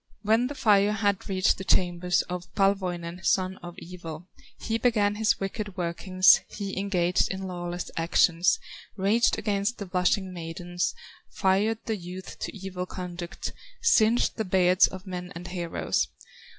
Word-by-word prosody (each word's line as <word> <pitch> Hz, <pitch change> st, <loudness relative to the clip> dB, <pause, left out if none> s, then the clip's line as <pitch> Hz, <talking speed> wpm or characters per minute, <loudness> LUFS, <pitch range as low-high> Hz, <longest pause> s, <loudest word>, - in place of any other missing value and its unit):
When 225 Hz, +4 st, +3 dB
the 285 Hz, -, -6 dB
fire 205 Hz, -5 st, +4 dB
had 205 Hz, -3 st, 0 dB
reached 185 Hz, -1 st, +2 dB
the -, -, -4 dB
chambers 180 Hz, -1 st, +2 dB
Of 180 Hz, -1 st, -6 dB
Palwoinen, 180 Hz, -3 st, 0 dB
son 185 Hz, +1 st, +1 dB
of 175 Hz, -1 st, -10 dB
evil, 170 Hz, -1 st, -9 dB, 0.3 s
He 225 Hz, 0 st, -2 dB
began 210 Hz, -4 st, +2 dB
his 215 Hz, +1 st, +1 dB
wicked 200 Hz, 0 st, -4 dB
workings, 185 Hz, +2 st, +4 dB
He 200 Hz, -2 st, -5 dB
engaged 180 Hz, -3 st, +1 dB
in 190 Hz, 0 st, -4 dB
lawless 175 Hz, -1 st, -5 dB
actions, 165 Hz, +1 st, +3 dB, 0.4 s
Raged 210 Hz, +5 st, +3 dB
against 205 Hz, +2 st, -1 dB
the 200 Hz, -, -5 dB
blushing 185 Hz, +1 st, 0 dB
maidens, 175 Hz, +2 st, -3 dB, 0.3 s
Fired 200 Hz, +4 st, +1 dB
the 220 Hz, -2 st, -1 dB
youth 180 Hz, +1 st, -9 dB
to -, -, -5 dB
evil 185 Hz, -1 st, -5 dB
conduct, 175 Hz, -2 st, -6 dB, 0.3 s
Singed 240 Hz, -, +3 dB
the 220 Hz, -, 0 dB
beards 185 Hz, -2 st, +4 dB
of 190 Hz, +1 st, -9 dB
men 180 Hz, -1 st, -6 dB
and 175 Hz, +1 st, -7 dB
heroes. 175 Hz, -2 st, -1 dB
185 Hz, 145 wpm, -27 LUFS, 175-200 Hz, 0.4 s, fire